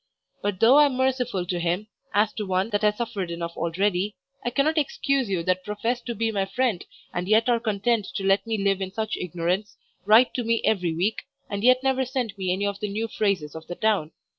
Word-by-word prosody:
But 205 Hz, -2 st, -2 dB
though 240 Hz, +5 st, +7 dB
I 295 Hz, -, +7 dB
am 270 Hz, -, -3 dB
merciful 250 Hz, -7 st, 0 dB
to 180 Hz, 0 st, -2 dB
him, 175 Hz, +4 st, -1 dB, 0.3 s
as 210 Hz, +1 st, +2 dB
to 215 Hz, -, -4 dB
one 190 Hz, +4 st, 0 dB
that 205 Hz, -, +1 dB
has 210 Hz, -1 st, +2 dB
suffered 220 Hz, -7 st, -3 dB
enough 170 Hz, 0 st, -5 dB
already, 190 Hz, +4 st, 0 dB, 0.3 s
I 240 Hz, -, 0 dB
cannot 305 Hz, +5 st, +2 dB
excuse 275 Hz, -4 st, 0 dB
you 180 Hz, -4 st, -1 dB
that 185 Hz, +1 st, 0 dB
profess 225 Hz, +5 st, -2 dB
to 235 Hz, -1 st, -5 dB
be 225 Hz, +1 st, 0 dB
my 195 Hz, -2 st, 0 dB
friend 220 Hz, -1 st, 0 dB, 0.3 s
and 180 Hz, +1 st, -3 dB
yet 220 Hz, +3 st, +4 dB
are 240 Hz, -1 st, +3 dB
content 215 Hz, -1 st, 0 dB
to 195 Hz, -, -2 dB
let 195 Hz, +3 st, +2 dB
me 225 Hz, -1 st, 0 dB
live 195 Hz, -1 st, +1 dB
in 190 Hz, -1 st, -3 dB
such 220 Hz, +2 st, -2 dB
ignorance, 180 Hz, +4 st, -2 dB, 0.3 s
write 220 Hz, +5 st, +6 dB
to 245 Hz, -, -2 dB
me 230 Hz, 0 st, 0 dB
every 180 Hz, -6 st, +1 dB
week, 195 Hz, +7 st, -1 dB, 0.2 s
and 200 Hz, 0 st, -3 dB
yet 255 Hz, +1 st, +5 dB
never 265 Hz, -1 st, +2 dB
send 250 Hz, -5 st, -3 dB
me 190 Hz, -2 st, -2 dB
any 195 Hz, +2 st, 0 dB
of 200 Hz, 0 st, -2 dB
the 210 Hz, -, -3 dB
new 220 Hz, +3 st, -2 dB
phrases 195 Hz, -9 st, -1 dB
of 160 Hz, 0 st, -9 dB
the 175 Hz, -, -5 dB
town. 205 Hz, -8 st, +1 dB
210 Hz, 225 wpm, -25 LUFS, 185-235 Hz, 0.3 s, though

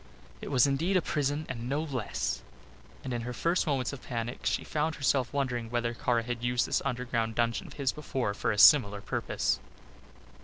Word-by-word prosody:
It -, -, -6 dB
was 130 Hz, -2 st, +5 dB
indeed 160 Hz, +8 st, +1 dB
a -, -, +3 dB
prison 145 Hz, +1 st, -1 dB
and 120 Hz, -1 st, -5 dB
no 145 Hz, +3 st, 0 dB
less, 130 Hz, -8 st, -2 dB, 0.6 s
and 130 Hz, -, -4 dB
in 120 Hz, -, -2 dB
her 125 Hz, +1 st, -4 dB
first 170 Hz, +6 st, +1 dB
moments 135 Hz, -2 st, 0 dB
of 135 Hz, -, -8 dB
panic 120 Hz, 0 st, -4 dB
she -, -, 0 dB
found 155 Hz, +1 st, -1 dB
herself 135 Hz, -3 st, +1 dB
wondering 125 Hz, -5 st, -1 dB
whether 120 Hz, 0 st, -1 dB
Kara 120 Hz, 0 st, 0 dB
had 120 Hz, 0 st, -4 dB
used 120 Hz, 0 st, +2 dB
this -, -, 0 dB
underground 120 Hz, -4 st, -1 dB
dungeon 115 Hz, -1 st, 0 dB
of -, -, -11 dB
his 140 Hz, -3 st, 0 dB
before 130 Hz, -8 st, -2 dB
for -, -, -1 dB
a 105 Hz, -, -2 dB
similar 105 Hz, -5 st, +7 dB
purpose. -, -, -1 dB
125 Hz, 190 wpm, -30 LUFS, 120-140 Hz, 0.6 s, similar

